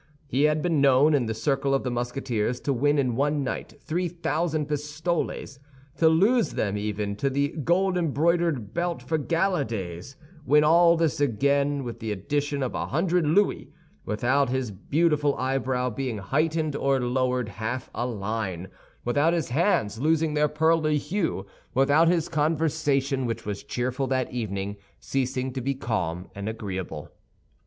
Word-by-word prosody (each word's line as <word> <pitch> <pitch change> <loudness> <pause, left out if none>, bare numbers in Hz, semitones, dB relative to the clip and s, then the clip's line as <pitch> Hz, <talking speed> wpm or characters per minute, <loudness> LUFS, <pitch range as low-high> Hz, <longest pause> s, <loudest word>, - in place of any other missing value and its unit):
He 140 +1 +1
had 150 0 +2
been 165 -5 +2
known, 140 +2 +5
in 130 -5 +2
the 110 - -2
circle 135 +3 +1
of 135 - -1
the 125 - -2
Musketeers, 120 -1 -2
to 140 - 0
win 145 +4 +2
in 130 -4 +1
one 145 +2 +1
night 135 - -4
three 175 +2 -1
thousand 160 -2 -1
pistoles; 150 -1 -3 0.4
to 160 - +5
lose 205 +9 +3
them 100 -1 -1
even 105 0 -2
to 140 +6 0
the 140 +1 0
gold 180 +5 +1
embroidered 165 - +1
belt 170 0 -2
for 160 -1 -1
gala 170 +2 +1
days, 95 0 -6 0.3
win 150 +2 +4
all 170 +2 +5
this 160 -6 +1
again 140 +2 +1
with 120 -2 -6
the 110 -2 -3
addition 140 +8 -1
of 130 - -2
a - - -2
hundred 170 +2 +1
louis, 180 -3 +2 0.3
without 125 +6 +1
his 130 -3 -1
beautiful 150 - +1
eyebrow 130 -1 0
being 125 -1 -3
heightened 155 +7 0
or 135 -1 +1
lowered 125 -1 0
half 115 +3 -4
a 120 - -2
line, 100 -5 -3 0.4
without 145 +7 +2
his 165 -6 -1
hands 120 - +1
losing 155 +2 +2
their 150 0 +3
pearly 155 0 +2
hue, 160 - -2 0.3
without 145 +5 +4
his 170 -2 +2
conversation, 150 -4 0
which 115 -1 -4
was 100 -1 -4
cheerful 130 +2 -2
that 130 -1 -1
evening, 100 -4 -3 0.2
ceasing 130 -1 -2
to 130 - -3
be 135 +2 -1
calm 90 -9 -2
and 100 +2 -4
agreeable. 95 -8 -5
140 Hz, 160 wpm, -26 LUFS, 120-155 Hz, 0.4 s, known